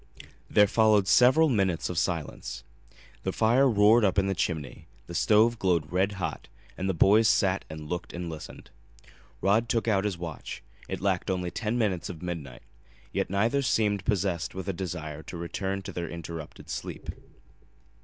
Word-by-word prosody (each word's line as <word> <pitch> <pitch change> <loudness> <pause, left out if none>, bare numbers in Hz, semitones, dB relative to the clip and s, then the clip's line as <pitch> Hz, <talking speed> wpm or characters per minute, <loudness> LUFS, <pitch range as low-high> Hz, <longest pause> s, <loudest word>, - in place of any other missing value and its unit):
There 105 - +6
followed 105 -2 +3
several 130 - +6
minutes 95 - +1
of 90 - -4
silence. 80 -8 -3 0.6
The - - -2
fire 120 +5 +3
roared 110 +1 +5
up 95 -3 +3
the 95 -1 +2
chimney, 80 -5 -3 0.2
the 85 - -9
stove 110 +5 +3
glowed 85 -5 +1
red 95 +3 +1
hot 95 -3 -4 0.3
and 95 +1 -2
the 95 - 0
boys 105 +6 +5
sat 95 -2 +2
and 80 -1 -8
looked 90 +2 -4
and 85 0 -5
listened. 80 -1 -9 0.7
Rod 110 +4 +2
took 115 0 0
out 100 -3 +2
his 100 -4 -1
watch. 85 -7 -7 0.3
It - - -4
lacked 95 -1 0
only 90 -2 -1
ten 115 +1 -2
minutes 100 -6 0
of 90 -2 -8
midnight. 80 -10 -6 0.5
Yet - - -1
neither 115 +8 +1
seemed 105 -6 +1
possessed 95 -6 -1
with 95 0 -5
a 95 - -1
desire 80 -5 -5
to 85 - -8
return 95 +3 -3
to - - -6
their 85 -2 -4
interrupted 85 -2 -8
sleep. - - -5
95 Hz, 165 wpm, -28 LUFS, 85-105 Hz, 0.7 s, There